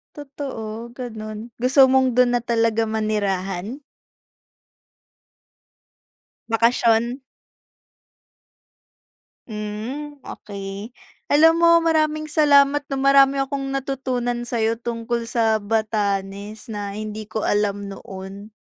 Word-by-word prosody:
Totoo, 240 -6 -7
ganun. 220 -2 -7
Gusto 260 +2 +5
mong 260 -1 +3
dun 245 0 +4
na - - -4
talaga 230 -1 +1
manirahan? 210 +1 -2 2.7
Bakasyon. 235 +2 +2 2.3
Hmm, 230 +7 -6
okey. 200 +3 -8 0.3
Alam 325 +3 +5
mo 335 0 +5
maraming 310 -1 +1
salamat 290 -1 +5
'no 275 - -3
marami 275 0 +4
akong 275 0 -4
natutunan 250 -3 -2
sa'yo 230 -1 0
tungkol 235 0 -3
sa 225 -2 +1
Batanes 205 0 -2
na 205 -1 -5
hindi 215 0 -6
ko 220 0 -4
alam 205 -1 0
noon. 195 +2 -9
230 Hz, 90 wpm, -22 LUFS, 215-270 Hz, 2.7 s, Gusto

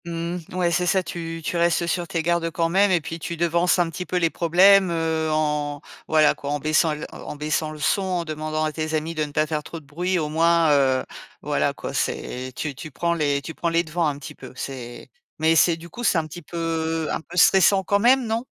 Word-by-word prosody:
Mmh. 170 +1 -4 0.2
Ouais, 180 -1 +1
c'est 175 +1 +1
ça, 190 +1 +2
tu 165 -1 -6
tu 175 - -1
restes 170 0 +2
sur 170 0 -2
tes 165 -1 -2
gardes 170 0 +1
quand 165 0 -1
même, 195 +4 +3
et 180 -3 +2
puis 165 +2 -6
tu 170 +1 -5
devances 170 +2 +2
un 175 -1 +2
petit 180 +3 -6
peu 180 - -1
les 165 -2 +2
problèmes, 185 +3 +5
heu, 160 -1 -1
en, 150 -1 -1 0.3
voilà 155 -1 +4
quoi 140 - -7
en 145 - 0
baissant, 155 +1 +2
heu, 150 - -6
en - - -8
baissant 155 +1 -1
le 155 - -8
son, 150 +6 +1
en 180 -3 -2
demandant 155 0 -3
à 155 - 0
tes 155 0 -3
amis 155 +2 -2
de 155 -1 -1
ne 150 - -5
pas 155 +1 +1
faire 155 -1 -2
trop 165 +2 -8
de 155 - -21
bruit 175 +6 -1
au 155 -3 -1
moins, 165 +1 +3
heu, 135 -2 +3 0.4
voilà - - 0
quoi, - - -6
c'est 130 +1 -3
tu 150 -2 -3
tu, 155 - -9
prends 170 +4 -1
les 145 -4 0
tu 160 - -7
prends 170 - -2
les 165 +1 +2
devants 165 0 -1
un 145 -2 -2
petit 145 - -9
peu. 130 - -12
C'est 125 -2 -7 0.3
mais 160 +1 +3
c'est, 165 +1 +4
du 170 +1 -11
coup 240 +9 -8
c'est 195 - +3
un 160 - 0
petit 155 +3 -9
peu 165 -1 -2
un - - -2
peu 170 +2 -11
stressant 190 +2 +5
quand 200 +2 +1
même, 250 +3 +4
non? 225 +2 -2
165 Hz, 245 wpm, -23 LUFS, 155-175 Hz, 0.4 s, problèmes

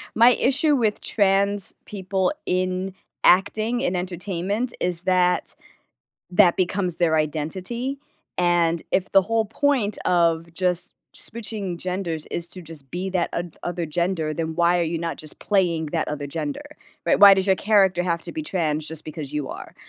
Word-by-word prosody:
my 235 +2 +7
issue 280 +4 +2
with 220 -5 0
trans 200 0 +2
people 190 -2 -1
in 185 +1 -1 0.3
acting, 220 +6 +3
in 230 -9 0
entertainment, 185 +5 -2
is 175 -1 0
that, 180 -1 +2 0.8
that 180 -1 +5
becomes 185 -1 0
their 165 -2 +2
identity, 185 - -2 0.4
and 170 -2 +2
if 185 0 0
the 195 - +6
whole 225 +3 +1
point 225 -2 0
of 170 -1 +2
just 180 -1 0 0.2
switching 210 -6 -4
genders 180 -3 -3
is 170 - -3
to 185 +2 -6
just 155 -5 -10
be 180 +4 -3
that 180 -2 -1
oth 170 -1 -4
other 175 -1 -3
gender, 160 -1 -1
then 160 0 -3
why 175 +1 +3
are - - +2
you 165 0 -1
not 165 0 -3
just 155 -1 -8
playing 175 -6 +1
that 160 +1 -2
other 145 -1 -4
gender, 150 - -4 0.4
right? - - +3
Why 200 -1 +10
does 190 0 +2
your 190 -1 +4
character 195 -4 +3
have 170 -2 -1
to - - -8
be 315 - -4
trans 155 - -1
just 160 -1 -6
because 150 -2 -6
you 150 -3 -3
are, - - -9
180 Hz, 165 wpm, -23 LUFS, 165-200 Hz, 0.8 s, Why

